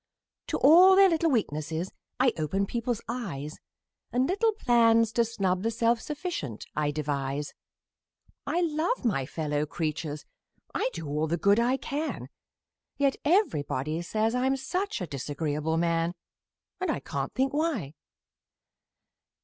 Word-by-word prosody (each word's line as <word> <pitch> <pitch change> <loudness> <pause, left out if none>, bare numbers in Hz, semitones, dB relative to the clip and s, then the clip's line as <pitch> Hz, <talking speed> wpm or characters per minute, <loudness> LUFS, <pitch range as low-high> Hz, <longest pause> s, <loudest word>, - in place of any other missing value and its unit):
To - - -1
all 360 +6 +8
their 390 0 +7
little 330 -1 +2
weaknesses 165 - -1 0.3
I 255 -2 +4
open 190 +6 -1
people's 235 +2 -2
eyes 170 - -5 0.5
And 255 +2 +2
little 440 +4 +2
plans 230 - +4
to 235 - +3
snub 195 -5 -1
the 225 - 0
self 230 0 +1
sufficient 295 - -5
I 150 -1 +1
devise; 145 -1 -2 0.9
I 350 - +1
love 330 - 0
my 135 - +1
fellow 150 -1 -2
creatures 155 -1 -3 0.5
I - - 0
do 165 -3 -6
all 150 +2 -1
the 170 +2 0
good 200 +6 +4
I 245 +3 +2
can 300 +3 -4 0.7
Yet 280 -1 +2
everybody 160 - +1
say 215 +5 -3
I'm 250 +4 +2
such 360 - -2
a - - -1
disagreeable 150 +2 -2
man! 170 +1 +1 0.6
And 370 - -1
I - - 0
can't - - -4
think 265 +1 +1
why! 285 - -1
215 Hz, 135 wpm, -28 LUFS, -, 0.9 s, all